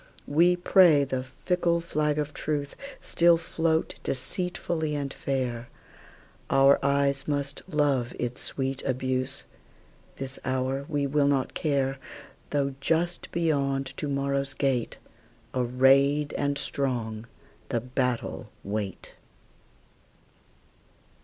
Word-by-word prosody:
We 170 +5 +4
pray 175 -4 +6
the 130 -2 -2
fickle 170 +5 0
flag 150 -3 0
of 150 0 -2
truceStill 170 - 0
float 165 -1 0
deceitfully 160 +2 -2
and 140 -1 -3
fair; 125 -3 -2 0.8
Our 135 +1 +5
eyes 140 0 +1
must 140 -1 -2
love 140 -6 +1
its 125 +1 -3
sweet 135 0 -2
abuse; 130 0 -2 0.7
This 135 -1 -6
hour 130 +1 -1
we 145 -2 0
will 140 +1 +2
not 140 -2 +1
care, 135 -3 0 0.5
Though 140 -1 0
just 170 +4 0
beyond 140 -5 0
to 150 - -3
morrow's 140 -1 -1
gate, 130 -4 0 0.6
Arrayed 135 +4 +3
and 140 0 0
strong, 120 -6 -2 0.4
the 120 - +1
battle 125 0 -2
wait. 100 -1 -4
140 Hz, 100 wpm, -27 LUFS, 130-150 Hz, 0.8 s, pray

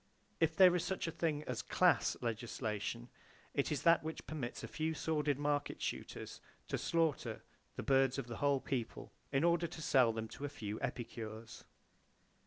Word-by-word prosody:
If 160 -1 +2
there 180 -1 +8
is 175 - +1
such 190 - -2
a 165 - -2
thing 155 -2 -1
as 125 -5 -3
"class" - - +3
legislation, 110 - -3 0.5
it 140 - 0
is 150 - -1
that 170 -1 +6
which 160 0 -5
permits 135 -6 -5
a - - -4
few 160 0 -2
sordid 150 -3 0
market 145 0 -1
shooters - - -5 0.3
to - - -1
slaughter 165 -4 0 0.3
the - - -4
birds 135 -1 +3
of 135 - -2
the 115 -1 -6
whole 140 -2 +2
people 120 -5 -4 0.2
in 135 +2 +2
order 170 0 +3
to 165 - -9
sell 125 -6 +5
them 110 0 -4
to 140 - -9
a 145 - -1
few 110 -6 -5
epicures. 115 -2 -5
140 Hz, 175 wpm, -36 LUFS, 120-160 Hz, 0.5 s, there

